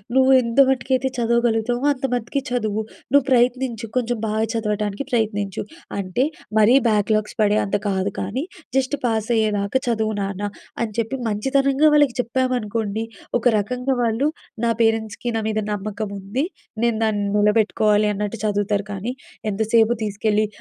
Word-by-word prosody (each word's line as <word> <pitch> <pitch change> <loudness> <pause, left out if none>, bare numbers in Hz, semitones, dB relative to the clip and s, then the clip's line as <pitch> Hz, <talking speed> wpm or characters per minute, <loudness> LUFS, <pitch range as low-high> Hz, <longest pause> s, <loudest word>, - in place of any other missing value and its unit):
నువ్వు 265 0 +5
ఎంతమటుకైతే 260 +1 +2
చదవగలుగుతావో 235 +1 +1
అంత 270 -2 -2
మట్టికి 245 +3 -1
చదువు. 220 -3 -1 0.3
నువ్వు 285 -2 +5
ప్రయత్నించు, 245 -2 +2
కొంచెం 245 -1 0
బాగా 220 0 0
చదవటానికి 210 0 -1
ప్రయత్నించు. 205 -4 -1 0.4
అంటే 190 +7 0 0.3
మరీ 215 +4 +6
బ్యాక్లాగ్స్ 215 +1 +1
పడే 210 0 +3
అంత 200 - -1
కాదు 195 0 0
కానీ, 215 +9 -2 0.3
జస్ట్ 270 +2 0
పాస్ 225 -1 0
అయ్యేదాకా 210 +2 +1
చదువు 220 -2 0
నాన్న" 195 0 -3 0.4
అని 220 - -4
చెప్పి 230 +4 -1
మంచితనంగా 270 +7 +2
వాళ్ళకి 290 -4 +4
చెప్పామనుకోండి, 230 -3 -1 0.3
ఒక 240 - -13
రకంగా 250 +5 -1
వాళ్ళు 230 +5 +1 0.4
నా 230 - +3
పేరెంట్స్‌కి 225 +1 0
నా - - -1
మీద 215 0 0
నమ్మకం 205 +1 -4
ఉంది. 220 +10 -2 0.4
నేను 235 -2 +2
దాన్ని 205 -2 0
నిలబెట్టుకోవాలి 210 0 +3
అన్నట్టు 210 +2 -3
చదువుతారు 205 0 0
కానీ, 205 +6 -3 0.4
ఎంతసేపు 220 +2 +3
తీసుకెళ్ళి, 210 +1 0
220 Hz, 135 wpm, -22 LUFS, 210-245 Hz, 0.4 s, మరీ